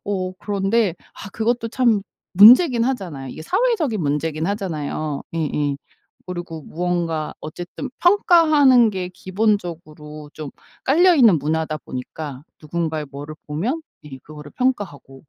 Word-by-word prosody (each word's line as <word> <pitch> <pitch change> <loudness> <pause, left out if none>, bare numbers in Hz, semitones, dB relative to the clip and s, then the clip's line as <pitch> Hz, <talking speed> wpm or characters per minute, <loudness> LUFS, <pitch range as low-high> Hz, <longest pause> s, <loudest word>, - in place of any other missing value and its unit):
어 185 -2 -2
그런데 200 -1 0 0.2
아 205 - -10
그것도 230 +1 -1
참 230 -4 +2 0.3
문제긴 235 - +7
하잖아요. 175 - -3
이게 155 - -9
사회적인 365 - 0
문제긴 155 +2 -1
하잖아요. 155 -7 -3
예예. 150 -3 -1 0.5
그리고 175 -3 -6
무언가 170 -2 -2
어쨌든 175 - -7
평가하는 310 - +5
게 185 -2 -4
기본적으로 170 -7 -3
좀 155 -3 -7 0.3
깔려있는 280 - +5
문화다 155 +2 -1
보니까 135 +2 -7 0.2
누군가의 160 -1 -3
뭐를 145 +2 -8
보면 210 - -2 0.2
예 135 -3 -10
그거를 150 -1 -11
평가하고. 190 - -3
180 Hz, 300 characters per minute, -21 LUFS, 155-230 Hz, 0.5 s, 문제긴